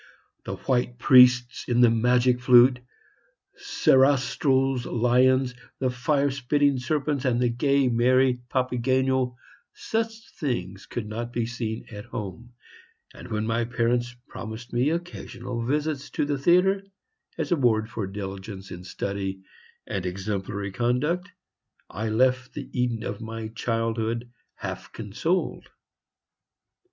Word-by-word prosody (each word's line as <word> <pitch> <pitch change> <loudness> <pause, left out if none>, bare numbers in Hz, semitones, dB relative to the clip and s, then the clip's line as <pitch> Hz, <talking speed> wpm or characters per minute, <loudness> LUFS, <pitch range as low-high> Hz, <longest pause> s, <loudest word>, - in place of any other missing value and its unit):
The - - -4
white 125 -2 -1
priests 125 -1 +5
in 120 0 +3
the 120 -2 +6
"Magic 125 +2 +3
Flute," 125 0 +6 0.8
Sarastro's 135 - +2
lions, 125 +2 +3 0.2
the 130 -1 0
fire 140 +3 +1
spitting 140 +1 +1
serpents, 140 +1 -1
and 125 -3 +1
the 125 -1 +2
gay, 135 +3 +2
merry 125 +1 +3
Papageno, 130 0 +1 0.4
such 225 0 -3
things 100 - -4
could 120 - -4
not 115 +2 -5
be 120 -1 -1
seen 115 -2 -4
at 105 -2 -8
home; 115 +2 -7 0.6
and - - -11
when 105 0 -2
my 115 +1 0
parents 120 +1 0
promised 110 +2 -8
me 125 +4 +2
occasional 165 -8 -4
visits 150 0 -1
to - - -1
the 145 -1 -1
theatre, 180 +6 +4 0.6
as - - -3
a - - +5
reward 115 -6 +2
for 110 -2 -4
diligence 95 0 -7
in 90 0 -8
study 95 0 -4 0.4
and 95 -2 -3
exemplary 100 +1 -3
conduct, 135 - 0 0.6
I 110 +5 -3
left 130 +3 +2
the - - -6
Eden 120 -3 -1
of - - -5
my 110 0 -5
childhood, 115 +1 -2 0.2
half - - -6
consoled. 115 - -2
125 Hz, 125 wpm, -26 LUFS, 115-130 Hz, 0.8 s, the